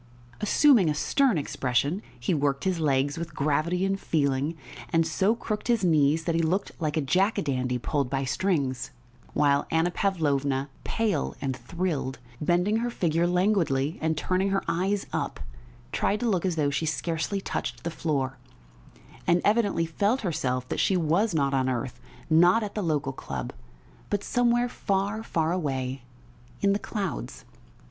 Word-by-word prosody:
Assuming 220 - +5
a 150 - 0
stern 260 - +2
expression, 140 - 0 0.2
he 120 +9 0
worked 140 -2 0
his 185 -3 0
legs 140 0 +1
with 170 -2 -6
gravity 155 +6 +1
and 195 0 0
feeling, 145 -1 0 0.4
and 165 0 +3
so 190 +8 +2
crooked 215 -2 -4
his 235 -4 +2
knees 155 -2 +3
that 170 - 0
he 165 - +2
looked 180 +5 0
like 155 -1 -1
a - - +2
jack 185 +10 +2
a - - +1
dandy 125 -3 -1
pulled 140 +1 -1
by 135 0 -1
strings, 135 -2 -1 0.5
while 140 -1 +3
Anna 165 +2 +2
Pavlovna, 145 -8 0
pale 225 -3 -1
and 135 -2 -2
thrilled, 140 +1 -3 0.2
bending 180 +7 +2
her 240 +1 -1
figure 170 -6 +1
languidly 175 -6 +1
and 160 -1 0
turning 185 +5 +1
her 195 0 0
eyes 195 +4 0
up, - - -2 0.5
tried 210 - 0
to 245 - +1
look 190 -4 +1
as 180 - -1
though 145 -3 +1
she 150 +3 -1
scarcely 165 +5 -1
touched 120 -9 -4
the 170 - -2
floor, 135 -6 -2 0.9
and 175 +1 +4
evidently 205 -5 +2
felt 205 +10 0
herself 130 - -1
that - - -2
she 190 - +3
was 175 +5 +1
not 140 -2 +1
on 130 -1 +2
earth, 125 0 -3 0.3
not 175 +7 +5
at 205 - -5
the 210 - -2
local 150 -6 -1
club, 65 - -5 0.6
but 205 -1 -1
somewhere 240 0 +2
far, 200 -1 -1
far 165 -7 0
away 135 -6 -2 0.6
in 200 -1 +3
the 200 - 0
clouds. 200 -6 -4
165 Hz, 165 wpm, -27 LUFS, 140-195 Hz, 0.9 s, Assuming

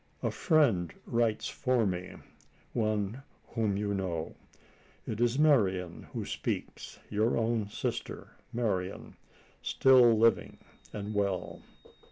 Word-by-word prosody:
A - - +1
friend 120 - +2
writes 115 -2 0
for 125 -3 +1
me 90 -2 -3 0.6
one 110 +1 -1 0.3
whom 110 -4 0
you 100 0 -1
know. 90 -5 -3 0.7
It 110 +1 -4
is 120 +1 +2
Marian 95 - +2
who - - -4
speaks - - -4
your 110 +3 +1
own 115 -2 0
sister - - -4 0.2
Marian 100 -5 -2 0.5
still 125 -4 +5
living 115 -3 +2 0.3
and 105 0 -5
well. 100 -3 -2
110 Hz, 110 wpm, -30 LUFS, 95-120 Hz, 0.7 s, still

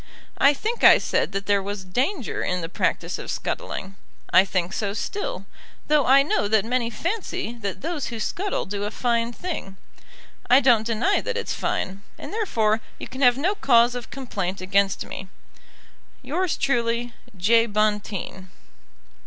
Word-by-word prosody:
I 285 +1 +5
think 450 - -3
I - - +9
said - - 0
that 195 0 -3
there 200 -1 +2
was 200 0 -5
danger 255 - -1
in 180 0 -1
the 165 - -5
practice - - -1
of - - -7
scuttling. 195 0 -4 0.4
I 185 +2 +8
think 185 -1 -1
so 200 -2 -2
still, 415 - -4 0.4
though 300 -3 +3
I 275 +2 +7
know 210 -7 0
that 215 -1 +2
many 240 0 0
fancy 335 - -3
that 195 -2 -4
those 325 -1 -3
who 230 -2 -5
scuttle 385 - -2
do 200 +1 -3
a - - -1
fine 235 0 0
thing. 240 - -6 0.7
I 255 - +8
don't 235 -5 +4
deny 235 - +1
that - - -3
it's 475 - -2
fine, 190 +1 -2 0.2
and - - -8
therefore 225 - +1 0.2
you - - -7
can 260 +2 -8
have 245 -1 +5
no 350 +9 +1
cause 245 - +4
of 245 -1 -6
complaint 200 -8 -4
against 195 +1 +1
me. 190 - -7 1.0
Yours 370 -2 -1
truly, 240 -2 0 0.2
J. 230 +5 +4
BONTEEN. 210 -3 -2
230 Hz, 160 wpm, -24 LUFS, 200-275 Hz, 1.0 s, I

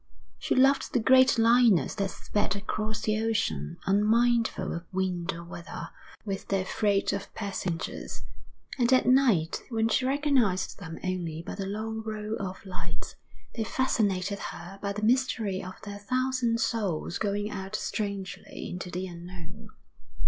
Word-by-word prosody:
She - - 0
loved 270 +1 +4
the - - +4
great 260 +2 +6
liners 230 - +5
that 200 -2 -1
sped 205 0 -1
across 215 +1 -2
the 215 0 +1
ocean, 80 - 0
unmindful 220 0 +3
of 170 0 -7
wind 185 -2 -1
or 170 +1 -7
weather, 170 0 -7 0.4
with 195 -2 -4
their 195 -1 +1
freight 200 0 +1
of 200 0 -4
passengers; 190 -5 -4 0.6
and 240 0 +3
at 255 - +5
night, 245 -11 +4
when 225 -2 +1
she 230 +3 +2
recognised 260 -9 +2
them 165 -4 -7
only 170 -3 -2
by - - -5
the 195 -1 -4
long 220 +2 -3
row 215 0 -3
of 190 -1 -5
lights, 185 -1 -6 0.4
they 225 - -1
fascinated 200 -6 +1
her 190 +3 -7
by 200 0 -1
the 210 +1 -4
mystery 225 -5 +2
of 185 0 -8
their 205 -1 -6
thousand 255 +1 +1
souls 195 -8 -1
going 205 0 -1
out 190 +1 -4
strangely 200 -3 -4
into 180 0 -5
the 180 +1 -3
unknown. 175 -1 -9
205 Hz, 150 wpm, -28 LUFS, 185-225 Hz, 0.6 s, great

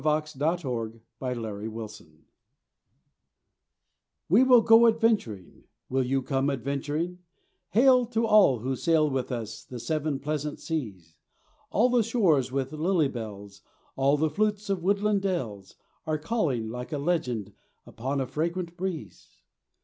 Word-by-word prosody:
THE 155 +1 0
YOUNG 130 -9 -1 0.2
ADVENTURERS 110 -6 -5 2.2
We 210 +10 +6
will 250 -2 +7
go 225 +1 +7
adventuring, 220 - 0 0.2
will 130 0 +1
you 135 +1 0
come 135 +1 0
adventuring, 145 +6 -3 0.5
Hail, 250 +3 +5
to 230 -1 0
all 205 - +5
who 130 +2 -1
sail 155 -1 +2
with 130 0 -2
us 115 -3 -5
the 125 - -8
seven 155 +1 -1
pleasant 150 +1 -3
seas: 95 - -5 0.5
All 240 +4 +3
the 245 -1 +4
shores 180 - +2
with 135 +1 -2
lily 160 -1 +1
bells, 100 -4 -8 0.3
all 135 +2 +3
the 155 +1 +1
flutes 210 +3 0
of 190 -3 -1
woodland 200 +2 +1
dells 115 - -3 0.3
Are 155 -1 0
calling 150 - -1
like 125 +5 -6
a 150 - -1
legend 125 - -1 0.3
upon 135 +4 -3
a 135 - 0
fragrant 170 +6 -3
breeze. 170 - -7
150 Hz, 130 wpm, -27 LUFS, 125-185 Hz, 2.2 s, will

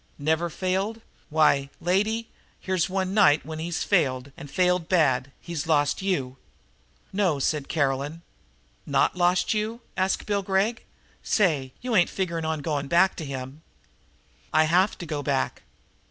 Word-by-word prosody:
Never 160 +4 0
failed? 190 +6 -2 0.3
Why, 150 -3 +3
lady, 210 +6 0 0.3
here's 185 -1 0
one 190 0 -1
night 185 -8 +4
when 155 0 -6
he's 170 +1 -2
failed 140 -8 +1
and 145 - -10
failed 180 +2 +1
bad. 140 -7 +2
He's 165 -3 -5
lost 145 0 +2
you!" 140 -10 -1 0.8
"No," 190 -6 +2
said 140 +1 -1
Caroline. 145 +2 -1 0.6
"Not - - +2
lost 180 +2 +2
you?" 215 +2 -2 0.2
asked 190 +1 0
Bill 205 -1 0
Gregg. 195 +4 0 0.4
"Say, 150 - +1
you 245 -2 -1
ain't 175 -4 +4
figuring 170 -4 -2
on 160 -1 -2
going 145 -2 -2
back 180 +5 +4
to 160 - -5
him?" 135 +2 -6 0.9
"I 155 - +5
have 180 +5 +2
to 175 - -7
go 150 -3 -3
back." 140 -2 -1
170 Hz, 145 wpm, -25 LUFS, 145-190 Hz, 0.9 s, I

